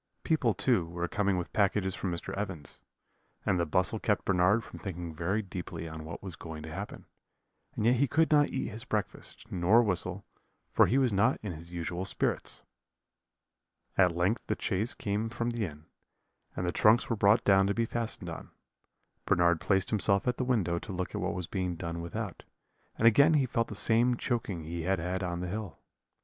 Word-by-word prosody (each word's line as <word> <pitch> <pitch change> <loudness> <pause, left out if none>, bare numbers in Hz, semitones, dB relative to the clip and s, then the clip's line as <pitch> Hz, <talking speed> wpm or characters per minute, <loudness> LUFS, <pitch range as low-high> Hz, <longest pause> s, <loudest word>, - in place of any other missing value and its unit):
People, 130 - +2
too, 100 -9 +2
were 85 +1 -3
coming 100 +1 +1
with 90 - -4
packages 100 -2 +2
from 95 - -3
Mr. 85 - -5
Evans's, 95 -8 -5 0.7
and 90 - +2
the 85 - 0
bustle 95 +7 +1
kept 105 -2 0
Bernard 95 +4 +3
from - - -11
thinking 90 -4 -5
very 90 +7 -1
deeply 90 -3 -6
on 80 -1 -7
what 80 +4 -8
was 95 -4 -5
going 80 -2 -8
to 80 0 -7
happen; - - -7 0.7
and 105 - -1
yet 120 +2 +4
he 140 +3 +3
could 160 +6 +2
not 145 -1 +5
eat 135 - -2
his 110 +3 -7
breakfast, 110 -5 -4
nor 95 +7 +4
whistle, 95 -6 -2 0.5
for - - +6
he 130 - +2
was 130 -5 +3
not 115 +7 +3
in 105 - -3
his 85 +1 -9
usual 85 +1 -3
spirits. - - -2 1.3
"At 90 -3 +4
length 95 +7 +1
the - - -1
chaise 105 +4 0
came 105 +2 -2
from 120 +1 -2
the 115 -2 -1
inn, 75 -1 -12 0.7
and 90 - -2
the 90 - +1
trunks 110 +6 +4
were 115 - 0
brought 100 +2 +4
down 95 -1 +5
to 100 - 0
be 115 - +1
fastened 115 0 -3
on. - - -8 0.8
"Bernard 85 -2 +3
placed 95 -2 +1
himself 100 -1 +2
at 125 - +1
the - - 0
window 100 -9 +1
to 105 - -8
look 90 -1 -3
at - - -3
what - - -1
was 90 - -3
being 90 0 -2
done 85 0 -4
without; 85 -1 -5 0.5
and 115 - +4
again 140 +8 +6
he 140 -3 +3
felt 115 -1 0
the - - -7
same 120 +2 +2
choking 110 - -2
he 85 +2 -4
had 95 +3 +1
had 90 +3 -2
on 85 -1 -2
the 90 - -3
hill. 100 -4 -5
95 Hz, 200 wpm, -30 LUFS, 85-115 Hz, 1.3 s, for